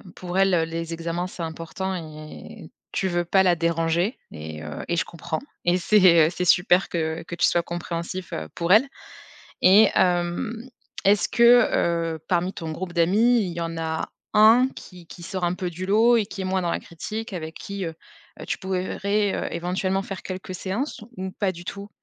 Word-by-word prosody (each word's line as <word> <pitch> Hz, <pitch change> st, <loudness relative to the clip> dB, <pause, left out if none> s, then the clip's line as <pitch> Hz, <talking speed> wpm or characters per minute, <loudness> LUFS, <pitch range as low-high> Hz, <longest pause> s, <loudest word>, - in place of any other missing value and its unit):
pour 180 Hz, 0 st, -5 dB
elle, 195 Hz, -1 st, +4 dB
heu, 165 Hz, -2 st, +3 dB
les 165 Hz, 0 st, -5 dB
examens 170 Hz, +1 st, -3 dB
c'est 180 Hz, -2 st, -7 dB
important 165 Hz, +4 st, -4 dB
et 155 Hz, -3 st, -9 dB, 0.2 s
tu 190 Hz, -, -1 dB
veux 175 Hz, -1 st, 0 dB
pas 190 Hz, +2 st, +4 dB
la 180 Hz, -2 st, +4 dB
déranger 170 Hz, -, 0 dB
et 80 Hz, 0 st, -8 dB
heu, 75 Hz, -1 st, -6 dB
et 170 Hz, -, 0 dB
je 165 Hz, -, +1 dB
comprends. 160 Hz, -1 st, -5 dB, 0.3 s
Et 175 Hz, +1 st, +3 dB
c'est, 180 Hz, -5 st, +5 dB
heu, -, -, 0 dB
c'est 180 Hz, +1 st, -3 dB
super 180 Hz, +1 st, +4 dB
que 160 Hz, -1 st, -2 dB
que 170 Hz, -, -10 dB
tu 170 Hz, -, +3 dB
sois 170 Hz, -, +1 dB
compréhensif, 175 Hz, +1 st, -5 dB
heu, 80 Hz, 0 st, -5 dB
pour 170 Hz, +1 st, -2 dB
elle 225 Hz, +8 st, +6 dB, 0.8 s
et 200 Hz, +3 st, +7 dB
hem, 185 Hz, +7 st, 0 dB, 0.4 s
est-ce 200 Hz, -1 st, +4 dB
que, -, -, -11 dB, 0.8 s
heu, 160 Hz, -, -7 dB
parmi 180 Hz, +1 st, +1 dB
ton 165 Hz, -4 st, -6 dB
groupe 175 Hz, +2 st, -5 dB
d'amis, 205 Hz, +8 st, +3 dB
il 180 Hz, -, -3 dB
y 170 Hz, -, -5 dB
en 165 Hz, 0 st, -3 dB
a 160 Hz, 0 st, -2 dB, 0.2 s
1, 225 Hz, +4 st, +6 dB
qui 180 Hz, -3 st, -12 dB
qui 175 Hz, -, -12 dB
sort 185 Hz, 0 st, -5 dB
un 175 Hz, +1 st, +1 dB
peu 180 Hz, -1 st, -4 dB
du 180 Hz, +2 st, -6 dB
lot 225 Hz, +4 st, +5 dB
et 220 Hz, -, +2 dB
qui 200 Hz, -, -8 dB
est -, -, -4 dB
moins 185 Hz, 0 st, 0 dB
dans 170 Hz, -, -1 dB
la -, -, -1 dB
critique, 215 Hz, +7 st, -7 dB
avec 160 Hz, -3 st, -5 dB
qui, 200 Hz, -1 st, -5 dB
heu 165 Hz, -1 st, -5 dB, 0.5 s
heu, -, -, -8 dB
tu -, -, -2 dB
pourrais 190 Hz, +2 st, -1 dB
éventuellement, 185 Hz, +2 st, -1 dB
faire 195 Hz, -1 st, -7 dB
quelques 185 Hz, 0 st, -6 dB
séances 205 Hz, +11 st, -3 dB, 0.2 s
ou 190 Hz, 0 st, -4 dB
pas 190 Hz, 0 st, -1 dB
du 175 Hz, 0 st, -11 dB
tout? 200 Hz, +2 st, -7 dB
180 Hz, 200 wpm, -24 LUFS, 170-195 Hz, 0.8 s, et